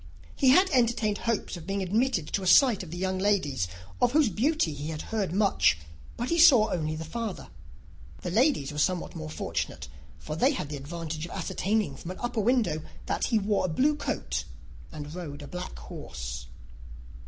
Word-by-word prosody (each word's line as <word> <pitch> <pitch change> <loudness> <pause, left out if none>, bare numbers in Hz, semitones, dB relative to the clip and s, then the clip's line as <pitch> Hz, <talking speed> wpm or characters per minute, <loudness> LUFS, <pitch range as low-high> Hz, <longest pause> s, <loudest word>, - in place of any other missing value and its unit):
He 270 - +4
had 370 +9 +6
entertained 230 -5 +2
hopes 230 -4 -1
of 170 -2 -10
being 195 0 -1
admitted 215 - +1
to 200 - +1
a 185 - -3
sight 240 +2 +6
of 180 - -8
the 175 - -6
young 190 +1 -1
ladies, 180 - +1 0.3
of 245 0 +3
whose 300 -5 +4
beauty 235 - +1
he 145 +1 -6
had 155 -1 -4
heard 205 -6 0
much; 195 - +3 0.4
but 240 +2 -2
he 335 - +1
saw 260 -10 +7
only 155 -3 -1
the 160 +1 -5
father. 220 - -5 0.7
The 180 - -3
ladies 225 - +2
were 150 - -4
somewhat 180 +3 0
more 75 0 -5
fortunate, 75 -2 -4 0.3
for 155 - -6
they 260 - +3
had 150 - -4
the 150 - -4
advantage 160 +2 -5
of - - -12
ascertaining, 195 -3 -1
from 170 - -8
an 185 - -6
upper 240 -2 -1
window, 225 -8 +2 0.2
that - - 0
he 230 - +2
wore 205 -1 +1
a - - -1
blue 280 - +2
coat 295 - -2 0.5
and 150 -1 -7
rode 150 -5 -7
a - - -8
black 180 - -6
horse. - - -7
185 Hz, 190 wpm, -28 LUFS, 155-235 Hz, 0.7 s, saw